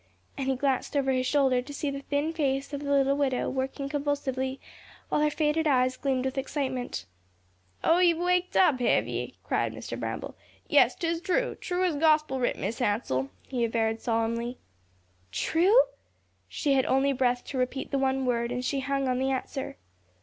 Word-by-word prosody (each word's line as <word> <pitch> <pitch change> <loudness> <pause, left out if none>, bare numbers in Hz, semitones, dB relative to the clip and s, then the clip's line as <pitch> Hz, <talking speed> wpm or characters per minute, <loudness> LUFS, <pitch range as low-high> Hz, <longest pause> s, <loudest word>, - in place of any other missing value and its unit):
and 270 - -3
he 265 - +2
glanced 270 +1 0
over 270 -1 +2
his 255 -1 +1
shoulder 265 -3 +3
to 270 +4 -10
see 285 -1 -2
the 275 0 -5
thin 290 +3 -1
face 275 -3 -1
of 285 - -3
the 285 - -4
little 275 -1 +3
widow 275 -3 0
working 270 +1 -3
convulsively, 275 -2 -2 0.5
while - - +1
her 300 - +3
faded 310 +1 +1
eyes 255 -2 +3
gleamed 260 -1 -1
with 265 +1 -1
excitement. 260 - -3 0.8
"Oh, 330 +2 +4
ye've 345 -2 +4
waked 360 +1 +1
up, 300 -8 +5
hev 245 - +2
ye?" - - -4
cried - - 0
Mr. - - -6
Bramble. - - -4 0.3
"Yes, - - +5
'tis 335 0 -2
true, 395 +7 0
true 360 0 -2
as 360 -3 +2
gospel 305 -3 +3
writ, 245 - 0
Mis' 225 - -3
Hansell," 205 - 0 0.2
he 250 -3 -1
averred 225 -1 0
solemnly. 230 +1 -1 0.7
"True?" 345 - +4 0.7
She 285 -3 0
had 265 -1 +2
only 270 +1 +3
breath 245 -2 +1
to 265 - -4
repeat 255 +2 -2
the 275 - +1
one 265 0 +1
word, 235 -1 0
and 250 0 -3
she 275 - 0
hung 275 0 -1
on 250 0 0
the 265 +1 +1
answer. 265 - -3
270 Hz, 180 wpm, -28 LUFS, 255-290 Hz, 0.8 s, up